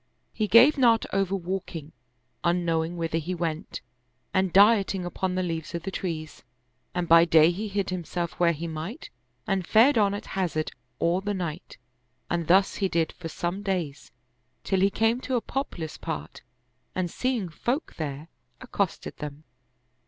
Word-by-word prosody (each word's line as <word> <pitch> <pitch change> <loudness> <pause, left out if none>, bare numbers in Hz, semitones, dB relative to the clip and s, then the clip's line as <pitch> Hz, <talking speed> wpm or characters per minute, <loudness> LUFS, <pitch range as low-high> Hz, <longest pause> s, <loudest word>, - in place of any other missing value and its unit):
He 215 - -1
gave 250 +9 +7
not 230 -3 +4
over 195 0 +1
walking, 175 -4 -5 0.5
un 175 0 +1
knowing 165 +1 0
whither 165 -1 -1
he 175 +3 -3
went 165 -2 -3 0.5
and 190 -1 +2
dieting 200 -2 +5
upon 180 +1 -2
the 185 - 0
leaves 165 -1 -4
of 170 - -4
the 195 - -4
trees; 160 -5 -5 0.5
and 175 -1 -1
by 165 0 +8
day 160 -1 +6
he 205 +5 -4
hid 200 -2 -2
himself 175 -1 -3
where 170 -1 +5
he 165 +1 -5
might 165 - -6 0.3
and 190 -3 -1
fared 230 +3 +5
on 200 -1 +3
at 205 - -6
hazard 170 -5 -1 0.3
all 175 +3 +1
the 205 +1 -2
night; 170 -3 -5 0.5
and 170 -2 -1
thus 190 +3 +4
he 195 -2 0
did 165 -2 +1
for 165 -2 -8
some 175 +5 -3
days, 180 -8 -3 0.5
till 190 - +1
he 195 +1 +4
came 225 +4 +1
to 260 - -2
a - - +3
populous 185 - -4
part - - -5 0.5
and 180 -2 -1
seeing 250 -7 -1
folk 245 - -2
there, 150 0 -4 0.3
ac 255 - -12
costed 200 -4 -2
them. 150 0 -7
180 Hz, 165 wpm, -26 LUFS, 165-200 Hz, 0.5 s, by